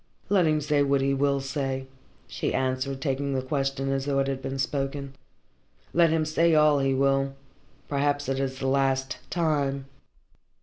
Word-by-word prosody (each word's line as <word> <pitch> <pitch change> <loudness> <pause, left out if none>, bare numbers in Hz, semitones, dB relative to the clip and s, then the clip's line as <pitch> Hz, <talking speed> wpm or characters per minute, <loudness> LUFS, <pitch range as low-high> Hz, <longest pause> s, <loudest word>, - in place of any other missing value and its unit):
"Let 190 -4 +4
him 155 0 +2
say 145 0 +1
what 140 -1 +2
he 135 0 +1
will 140 0 +1
say," 135 -1 -3 0.4
she - - -3
answered, 130 +1 -1
taking 140 0 -1
the 130 - -1
question 135 0 -1
as 135 0 -1
though 140 -1 0
it 135 0 +2
had 135 -1 -2
been 135 +1 -4
spoken. 135 0 -2 0.8
"Let 170 -1 +5
him 160 0 +1
say 160 +1 +3
all 150 -1 +5
he 135 -1 +1
will. 135 0 +1 0.5
Perhaps 145 0 0
it 135 0 -1
is 135 -1 -2
the 135 - -4
last 135 -1 +1
time." 145 -5 0
135 Hz, 170 wpm, -26 LUFS, 135-145 Hz, 0.8 s, Let